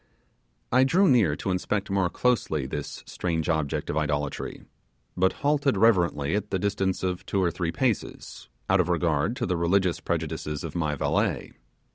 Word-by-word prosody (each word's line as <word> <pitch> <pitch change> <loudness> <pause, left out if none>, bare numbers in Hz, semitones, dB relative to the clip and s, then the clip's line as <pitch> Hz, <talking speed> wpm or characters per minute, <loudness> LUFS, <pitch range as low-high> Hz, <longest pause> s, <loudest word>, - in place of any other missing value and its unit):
I 130 +2 +5
drew 180 +9 +4
near 110 - +4
to 95 - -3
inspect 95 +2 -1
more 95 -2 +2
closely 95 - 0
this - - -6
strange 80 -2 -2
object 80 -4 -1
of 75 - -2
idolatry, 75 -2 -2 0.5
but 95 +1 +3
halted 145 -2 +2
reverently 85 -9 +3
at 105 0 -2
the 95 - 0
distance 95 -1 -1
of 90 -1 -2
two 100 - -1
or 90 -2 +2
three 85 -1 -2
paces, 120 +4 -3 0.2
out - - +3
of - - -3
regard 85 +3 +1
to 125 -2 -2
the 90 -4 0
religious 90 +1 +2
prejudices 80 -2 -3
of 80 -2 -5
my 75 -4 -1
valet. - - 0
90 Hz, 165 wpm, -26 LUFS, 80-105 Hz, 0.5 s, I